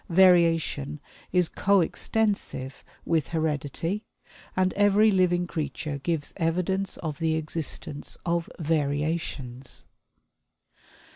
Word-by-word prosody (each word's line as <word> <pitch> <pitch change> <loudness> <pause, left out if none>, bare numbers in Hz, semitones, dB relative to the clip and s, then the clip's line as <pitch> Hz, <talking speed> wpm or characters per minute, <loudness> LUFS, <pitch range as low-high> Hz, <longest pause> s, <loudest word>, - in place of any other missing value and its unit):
Variation 165 -5 +4 0.3
is 180 -2 +3
co 200 +3 +3
extensive 195 -9 -1 0.2
with 160 -3 +1
heredity, 160 - -1 0.5
and 185 0 +2
every 205 +2 +5
living 180 -2 +3
creature 155 -3 -3
gives 160 0 -2
evidence 185 +4 0
of 155 -2 -5
the 160 -1 +1
existence 155 -2 -4
of 170 -1 0
variations. 145 -4 -2
165 Hz, 90 wpm, -27 LUFS, 150-185 Hz, 0.5 s, every